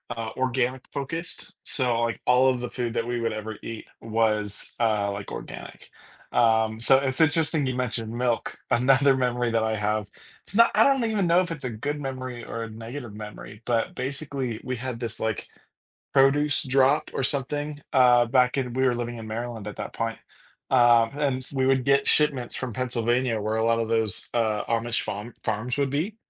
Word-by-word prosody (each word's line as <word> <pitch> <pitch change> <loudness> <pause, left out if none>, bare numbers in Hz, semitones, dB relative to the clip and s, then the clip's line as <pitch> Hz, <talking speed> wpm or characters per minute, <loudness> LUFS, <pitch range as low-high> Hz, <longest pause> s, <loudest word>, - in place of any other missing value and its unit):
uh, 115 -1 -4
organic-focused, 130 +5 -3
so, 120 -4 0
like, 115 0 -1
all 125 +1 +5
of 125 -1 -1
the 125 - -4
food 120 -2 -3
that 115 0 0
we 120 -1 -1
would 115 -1 -1
ever 110 0 -5
eat 115 -1 -6 0.2
was, 110 -2 -1
uh, 105 -3 +1
like, 100 0 -6
organic. - - -9 0.4
Um, 110 -1 +3
so 130 +3 +6
it's 135 +3 0
interesting 155 -1 +2
you 130 - -1
mentioned 115 -2 -3
milk, 120 -1 -1
another 135 +2 +4
memory 125 -2 0
that 115 -1 +1
I 110 0 0
have 105 0 -1 0.4
it's 200 - -8
not 230 +1 +7
I - - +6
don't 270 -3 +3
even 215 -4 +1
know 170 +1 +4
if 180 - -3
it's 150 -5 -5
a - - -1
good 145 +7 -3
memory 130 -3 -5
or 115 0 -5
a 115 - -6
negative 115 0 -8
memory, 105 0 -9
but 115 -2 0
basically 135 -3 -3
we 130 - -3
had 120 -1 -5
this, 115 -2 -2
like, 110 -2 -2 0.7
produce 145 +2 +3
drop 135 +3 +3
or - - -1
something, 145 +3 -1
uh, 125 -2 +5
back 125 +1 +3
in 125 -2 -2
we 130 +1 0
were 125 -2 +2
living 120 0 -4
in 110 - -8
Maryland 115 -1 -5
at 105 - -8
that - - -6
point, 115 0 -3 0.5
um, 120 -3 +5
and 130 -3 -1
we 130 -1 +1
would 135 -2 +3
get 140 0 +3
shipments 145 -5 +2
from 130 -3 -4
Pennsylvania 120 -1 0
where 110 +1 -1
a 110 - +1
lot 115 0 +3
of 115 - -2
those, 115 -2 +1
uh, 110 -3 +1
Amish 115 0 -1
farm 105 +4 -5
farms 115 +4 -1
would 140 -2 +1
be, 175 +10 -2
125 Hz, 190 wpm, -25 LUFS, 115-135 Hz, 0.7 s, not